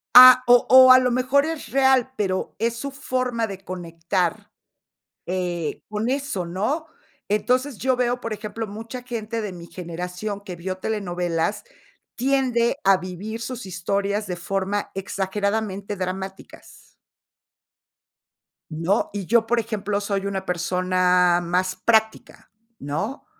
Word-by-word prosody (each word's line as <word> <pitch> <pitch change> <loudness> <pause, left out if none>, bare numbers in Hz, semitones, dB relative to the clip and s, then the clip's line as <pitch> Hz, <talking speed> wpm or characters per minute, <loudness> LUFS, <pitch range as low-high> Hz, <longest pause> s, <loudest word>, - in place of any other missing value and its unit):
Ah, 255 0 +11
o 245 0 +6
o 260 0 +9
a 255 - +10
lo 250 -1 +1
mejor 255 +3 +2
es 320 -5 -4
real, 265 0 +3
pero 190 -2 -2
es 230 +2 0
su 280 +4 -5
forma 255 -4 -2
de 195 -2 -8
conectar, 175 -1 -3 0.7
eh, 175 -3 -3
con 210 +3 -2
eso, 275 -9 -2
¿no?, 215 - -2 0.4
entonces, 250 +5 +1
yo 260 0 +1
veo, 245 0 0
por 230 -2 -4
ejemplo, 215 +1 -5
mucha 225 +4 -7
gente 230 -2 -4
de 205 -3 -5
mi 170 -1 -10
generación 180 +4 -6
que 185 -3 -8
vio 185 +2 -4
telenovelas, 180 -3 -2 0.5
tiende 250 -2 +1
a 195 -1 +5
vivir 190 +5 -6
sus 240 0 -6
historias 200 +3 -2
de 180 - -3
forma 195 +3 -2
exageradamente 200 +1 -2
dramáticas. 190 +1 -7 1.8
¿No?, 165 +6 0
y 200 -2 -4
yo, 225 +3 +3
por 240 0 +2
ejemplo, 210 -2 -2
soy 200 -1 -2
una 195 -1 -3
persona 180 0 +2
más 180 +2 0
práctica, 220 -1 0 0.3
¿no?, 195 - -4
205 Hz, 130 wpm, -23 LUFS, 185-240 Hz, 1.8 s, Ah